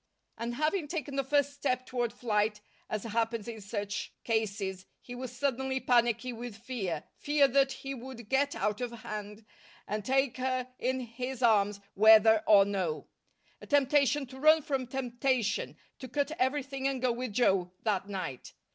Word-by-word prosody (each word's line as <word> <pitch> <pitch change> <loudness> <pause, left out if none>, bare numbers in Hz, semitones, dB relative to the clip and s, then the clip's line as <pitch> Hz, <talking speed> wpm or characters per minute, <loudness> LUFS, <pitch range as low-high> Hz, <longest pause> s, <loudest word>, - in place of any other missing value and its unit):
And 235 +1 -4
having 310 +4 0
taken 290 -4 -4
the 275 - +1
first 285 +1 +1
step 255 -3 -1
toward 240 -2 -1
flight, 210 -3 0 0.3
as 215 -2 -2
happens 230 0 -1
in 225 -2 -6
such 205 0 -4
cases, 200 -4 -2
he 245 - -10
was 250 0 -6
suddenly 265 0 -1
panicky 240 0 +2
with 235 -2 -7
fear, 205 -10 -4
fear 290 -1 +3
that 270 +1 +3
he 270 0 -5
would 245 -3 -9
get 280 +3 +1
out 210 +3 -1
of 245 -1 -2
hand, 210 -2 -7 0.4
and 210 +1 -3
take 270 +1 +1
her 255 0 -2
in 260 +1 0
his 250 +2 -5
arms, 205 -3 +3
whether 220 +1 +7
or 200 -2 +7
no; 185 -6 -2 0.5
a - - -11
temptation 285 0 +3
to 265 +1 -12
run 310 +2 +6
from 270 -3 -2
temptation, 255 - -1 0.2
to 260 - -7
cut 280 +4 -1
everything 270 0 0
and 265 -2 -2
go 250 - +3
with 240 -1 -4
Joe 190 -6 +2
that 205 -2 0
night. 185 -10 -5
245 Hz, 165 wpm, -30 LUFS, 215-265 Hz, 0.5 s, whether